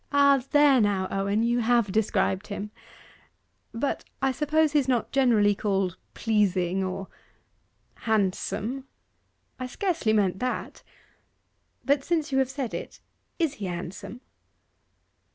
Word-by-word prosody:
'Ah, 280 -2 +5
there 290 -4 +5
now, 200 -3 +1
Owen, 200 +3 0
you 240 +1 +2
have 235 -3 +2
described 210 -1 0
him! 205 0 -5 1.0
But 235 +5 -2 0.2
I 270 0 +1
suppose 305 +2 +1
he's 290 -3 +2
not 250 -3 0
generally 230 -7 +4
called 195 -3 -1 0.2
pleasing, 195 -4 +1
or 190 +1 -4 0.5
' - - -43
'Handsome?' 220 +4 -1 0.7
'I 255 - -3
scarcely 330 - -1
meant 190 -3 +1
that. 255 0 -3 1.0
But 280 0 +2
since 320 -3 -1
you 265 - +2
have 265 -1 +1
said 270 -3 -4
it, - - -6 0.4
is 325 -5 +1
he 195 - -2
handsome? 185 +6 -6
225 Hz, 125 wpm, -26 LUFS, 195-270 Hz, 1.0 s, Ah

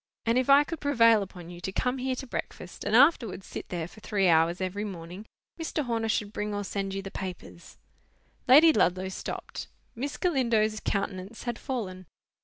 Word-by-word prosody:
and 230 +2 +3
if 255 - -1
I 280 +1 +8
could 325 +2 -6
prevail 230 -6 +4
upon 180 -3 -8
you 175 0 -10
to 190 - -3
come 250 +6 -1
here 260 0 -1
to 265 - -6
breakfast 180 -7 -6
and 220 - 0
afterwards 235 - +4
sit - - -7
there 170 -3 -3
for 215 - -15
three 200 -3 +1
hours 165 +1 +3
every 190 +2 -2
morning, 185 +1 -7 0.3
Mr. 320 -2 -2
Horner 225 -2 -1
should 210 -1 -1
bring 210 0 -3
or 205 - -2
send 195 -1 -3
you 195 - -4
the 195 - -7
papers—" 180 -3 -8 0.7
Lady 305 +5 +8
Ludlow 185 - +2
stopped. 190 - -6 0.3
Miss 280 +5 -4
Galindo's 230 - +1
countenance 200 +1 -3
had 240 -2 -3
fallen. 185 - -5
210 Hz, 185 wpm, -28 LUFS, 185-250 Hz, 0.7 s, I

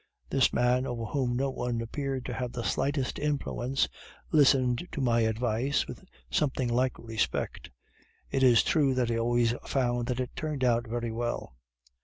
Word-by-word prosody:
This 135 -2 +4
man, 125 +2 +2
over 120 -3 -3
whom 125 0 -1
no 135 +2 0
one 125 -2 -2
appeared 135 +3 -3
to 125 - -4
have 125 0 -3
the 120 - -4
slightest 135 +1 -1
influence, 135 -3 0 0.4
listened 135 -1 +4
to - - -3
my 120 -3 +2
advice 115 +4 +1
with - - -9 0.3
something 130 -4 +1
like 125 +2 +1
respect. 115 -1 -2 0.6
It 135 - 0
is 125 -3 +6
true 140 -5 +2
that 125 -2 +1
he 115 0 0
always 120 0 +2
found 120 -3 0
that 125 -1 -1
it 125 - -2
turned 150 -4 -3
out 120 -1 +2
very 120 0 -2
well. 120 - -3
125 Hz, 165 wpm, -29 LUFS, 120-135 Hz, 0.6 s, is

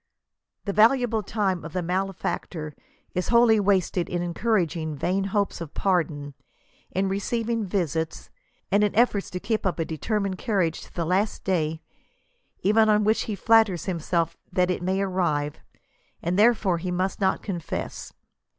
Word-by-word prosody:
" - - -55
The 200 - -2
valuable 230 +1 +4
time 195 -4 -1
of 165 - -8
the 180 - -1
malefactor 180 -4 -3 0.4
is 180 - -1
wholly 235 -2 +5
wasted 190 -3 +1
in 175 0 -1
encouraging 170 -4 0
vain 185 +7 0
hopes 200 -2 -1
of 160 -3 -7
pardon, 155 -7 0 0.6
in 190 +2 0
receiving 225 +3 -1
visits, 165 -4 -2 0.4
and 205 +1 +4
in 205 - +1
efforts 215 -3 +2
to 180 - -4
keep 220 +3 -1
up 185 - 0
a 165 - -1
determined 195 +4 -2
carriage 190 -8 0
to - - -13
the 170 - -2
last 195 +5 0
day, 160 -4 -1 0.8
even 220 +2 +4
on 210 0 +4
which 215 +2 +1
be 215 - -2
flatters 220 -4 +3
himself 170 -2 -1 0.2
that 180 0 +2
it 180 - -2
may 190 +2 0
arrive, 170 -6 -1 0.6
and 170 - -2
therefore 210 -6 +4
he 180 +2 -4
must 185 +3 -1
not 190 - +1
confess. 175 -5 -5
190 Hz, 155 wpm, -25 LUFS, 170-210 Hz, 0.8 s, wholly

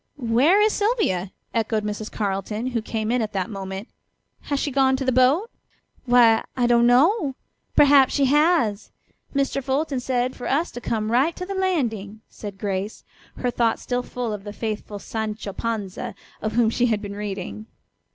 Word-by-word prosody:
"Where 265 - +3
is 425 0 +4
Sylvia?" 405 - 0 0.2
echoed 220 -1 0
Mrs. 210 +1 -4
Carleton, 205 +2 -2
who 235 -2 -1
came 220 0 -2
in 250 0 +2
at 215 -1 -3
that 190 +1 -2
moment. 195 +1 -6 0.6
"Has 285 -1 +1
she 290 - -1
gone 265 0 +3
to 265 0 -3
the 260 - +2
boat?" 270 - +3 0.5
"Why, 240 -2 +5
I 245 - +2
don't 240 0 +4
know. 280 - +3 0.4
Perhaps 280 -2 +6
she 280 - +3
has. 290 - +2 0.5
Mr. 275 0 0
Fulton 270 +1 0
said 250 0 -1
for 245 - -5
us 315 +6 +1
to 245 - -8
come 220 -2 -2
right 275 +8 +2
to 365 - -5
the 395 - -4
landing," 235 - -1
said 205 -2 -8
Grace, 200 0 -3 0.3
her 245 - -1
thoughts 230 -2 0
still 245 0 -1
full 245 -2 -4
of 205 -2 -6
the 205 0 -7
faithful 215 -1 -4
Sancho 215 -1 -4
Panza 210 -3 -4 0.3
of 215 0 -2
whom 230 -1 +3
she 245 +1 +2
had 215 -2 0
been 200 0 -6
reading. 205 +1 -5
235 Hz, 175 wpm, -23 LUFS, 210-270 Hz, 0.6 s, Perhaps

